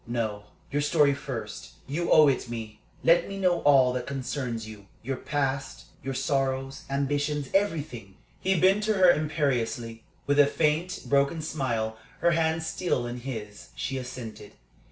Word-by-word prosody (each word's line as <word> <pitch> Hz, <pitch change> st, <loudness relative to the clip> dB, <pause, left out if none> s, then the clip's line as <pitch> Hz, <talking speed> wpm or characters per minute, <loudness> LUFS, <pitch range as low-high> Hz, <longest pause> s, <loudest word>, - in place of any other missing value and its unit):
"No, 110 Hz, -3 st, -2 dB, 0.3 s
your 145 Hz, +2 st, +1 dB
story 145 Hz, -1 st, +4 dB
first; 125 Hz, -6 st, -6 dB
you 165 Hz, +5 st, -2 dB
owe 155 Hz, -1 st, +8 dB
it 130 Hz, -3 st, 0 dB
me. 110 Hz, -2 st, -6 dB, 0.2 s
Let 170 Hz, +2 st, +4 dB
me 195 Hz, -, -5 dB
know 180 Hz, -2 st, +2 dB
all 135 Hz, -3 st, +5 dB
that 125 Hz, -1 st, -3 dB
concerns 130 Hz, -4 st, -3 dB
you. 105 Hz, -2 st, -11 dB, 0.2 s
Your 135 Hz, +3 st, -2 dB
past, 135 Hz, -1 st, -2 dB, 0.2 s
your 135 Hz, 0 st, -4 dB
sorrows, 135 Hz, 0 st, -1 dB
ambitions 145 Hz, +1 st, -1 dB
everything." 145 Hz, -, -1 dB, 0.2 s
He 190 Hz, -2 st, +1 dB
bent 190 Hz, +4 st, +4 dB
to 215 Hz, -, +2 dB
her 185 Hz, -2 st, +7 dB
imperiously. 125 Hz, -7 st, -1 dB, 0.2 s
With 145 Hz, 0 st, +2 dB
a 145 Hz, -, +7 dB
faint, 155 Hz, +4 st, 0 dB
broken 140 Hz, +3 st, +2 dB
smile, 115 Hz, -8 st, -2 dB, 0.2 s
her 170 Hz, +1 st, +4 dB
hands 160 Hz, -1 st, +1 dB
still 160 Hz, -5 st, -1 dB
in 120 Hz, +1 st, -5 dB
his, 110 Hz, -5 st, -7 dB
she 135 Hz, -1 st, -3 dB
assented. 125 Hz, -5 st, -8 dB
135 Hz, 155 wpm, -27 LUFS, 120-155 Hz, 0.3 s, owe